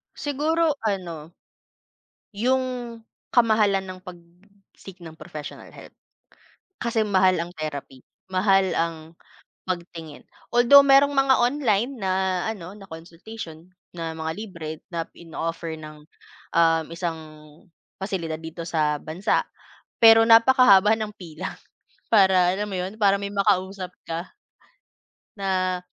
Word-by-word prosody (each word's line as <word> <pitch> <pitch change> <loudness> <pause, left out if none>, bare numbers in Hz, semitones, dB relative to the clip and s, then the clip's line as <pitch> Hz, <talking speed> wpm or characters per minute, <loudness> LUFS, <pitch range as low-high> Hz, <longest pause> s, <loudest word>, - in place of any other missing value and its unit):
Siguro 305 +2 0
ano 175 -7 -4 1.0
yung 255 +5 +1 0.7
kamahalan 215 -5 +3
ng 185 -1 -8
pag-seek 180 +1 -15
ng 160 -1 -11
professional 150 -1 -9
health, - - -14 0.9
kasi 230 -2 0
mahal 190 -2 +3
ang 170 - -7
therapy, 145 -4 -6 0.3
mahal 195 +1 +3
ang 165 0 0 0.7
pagtingin. 170 -4 -7 0.3
Although 240 +4 +7
merong 280 +1 +5
mga 270 -1 +4
online 240 -3 +1
na 185 -1 0
ano, 190 -3 -8
na 200 - -13
consultation, 165 +1 -10 0.2
na 165 -1 -4
mga 160 0 -4
libre, 185 -7 -7 0.2
na 165 -2 -3
ino-offer 165 -1 -5
ng, 155 -1 -11 0.5
um, 165 -1 +3
isang 170 -1 -4 0.8
pasilidad 170 -5 -4
dito 165 +1 -7
sa 155 -3 0
bansa, 160 +6 -1 0.6
pero 225 0 +8
napakahaba 225 -3 +6
ng 215 -1 -4
pila, 175 0 -7 0.6
para 190 -4 +5
alam 205 +2 -3
mo, 195 - -4
'yon, 185 +2 -4
para 200 -2 +4
may 200 0 -5
makausap 195 -2 0
ka 165 +2 -6 1.0
na 185 -2 -1
185 Hz, 115 wpm, -24 LUFS, 165-215 Hz, 1.0 s, pero